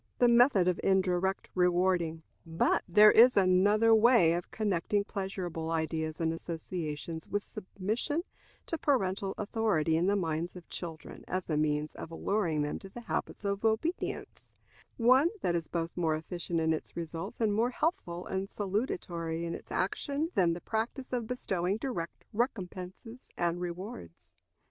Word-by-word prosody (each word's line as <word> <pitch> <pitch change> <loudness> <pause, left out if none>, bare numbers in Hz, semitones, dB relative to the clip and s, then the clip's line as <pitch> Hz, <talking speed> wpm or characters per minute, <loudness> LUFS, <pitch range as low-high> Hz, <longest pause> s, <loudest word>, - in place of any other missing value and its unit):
The 245 - +5
Method 235 -6 +5
of 180 - +1
Indirect 190 0 +1
Rewarding. 180 -2 +2 0.2
But 165 -1 +1
there 210 +4 +8
is 245 +1 +7
another 200 +4 +5
way 220 -7 +6
of 175 +1 -3
connecting 205 -1 0
pleasurable 190 -6 -4
ideas 160 -1 -2
and 165 -1 +1
associations 165 -1 -5
with 205 0 -1
submission 215 - -3 0.4
to 330 - -3
parental 195 -8 0
authority 205 -7 +1
in 170 +3 +2
the 200 - +3
minds 170 -2 -2
of 180 -2 -11
children, 165 -3 -7
as 185 0 -2
a - - +2
means 150 0 0
of - - -8
alluring 165 -3 0
them 145 - -3
to 195 - -11
the 240 - -9
habit 225 - -4
of 200 +1 -1
obedience 225 +11 -2 0.5
one 255 +7 +5
that 175 - +1
is 165 -2 -1
both 165 +1 -3
more 165 -3 +1
efficient 170 +1 -3
in 160 0 +2
its 155 - -6
results 165 -1 -5
and 220 -3 +2
more 230 +4 +2
healthful 240 - -2
and 190 +1 -3
salutary 175 -6 -2
in 170 - -3
its - - -9
action 285 - -1
than 175 -3 +3
the 175 - -6
practice 235 +4 -3
of 240 -3 -1
bestowing 195 -6 -1
direct 220 -10 -5
recompenses 210 +1 -4
and 175 0 0
rewards. 170 - -7
185 Hz, 155 wpm, -31 LUFS, 165-215 Hz, 0.5 s, there